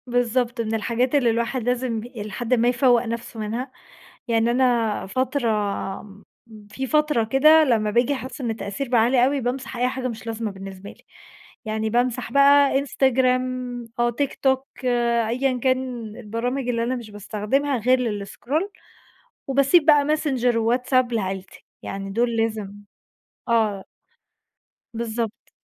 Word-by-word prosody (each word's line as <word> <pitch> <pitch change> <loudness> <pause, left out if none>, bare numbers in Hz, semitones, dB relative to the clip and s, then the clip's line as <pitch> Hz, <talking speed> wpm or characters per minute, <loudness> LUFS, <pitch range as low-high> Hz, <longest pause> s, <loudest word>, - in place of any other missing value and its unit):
بالضبط. 245 0 0
من 225 -1 -3
الحاجات 240 +5 0
اللي 260 -5 +3
الواحد 235 +2 -1
لازم 245 -1 -1
ب 215 - -7
إلي 220 -4 -8
حدٍ 240 +4 -2
ما 240 -1 +3
يفوّق 245 -1 +3
نفسه 230 0 -5
منها، 230 +5 -4 0.6
يعني 230 0 +2
أنا 240 -4 +1
فترة 255 +4 -1 0.6
م 200 0 -15 0.5
في 265 +3 -4
فترة 300 -4 +2
كده 305 +7 +5
لمّا 220 -6 +1
باجي 240 +5 +2
أحس 260 0 -6
إن 240 - -2
التأثير 225 +4 -5
بقى 240 -2 +4
عالي 245 +2 +4
أوي 275 +1 0
بامسح 255 +1 -3
أي 250 +1 +2
حاجة 255 0 -3
مش 230 -1 -7
لازمة 225 -1 -3
بالنسبة 195 0 -9
لي، - - -22 0.6
يعني 220 0 -2
بامسح 240 0 0
بقى 280 0 +5
إنستجرام، 255 -2 0
أو 240 0 +3
تيك 270 +4 -2
توك 265 0 +2 0.6
أيًا 255 +2 0
كان 255 -1 -1
البرامج 245 +3 -3
اللي 230 -1 0
أنا 250 +2 -1
مش 235 -4 -8
باستخدمها 215 +7 -1
غير 250 +3 +3
للإسكرول 245 - -3 0.8
وباسيب 275 +4 +4
بقى 295 -2 +6
ماسنجر 270 -6 +1
وواتس 245 +3 0
آب 255 -1 +3
لعيلتي 195 -3 -4 0.2
يعني 195 0 -5
دول 235 +3 0
لازم 220 -3 -2 0.8
آه. 215 -4 +1 1.1
بالضبط. 230 0 -4
245 Hz, 145 wpm, -23 LUFS, 225-260 Hz, 1.1 s, بقى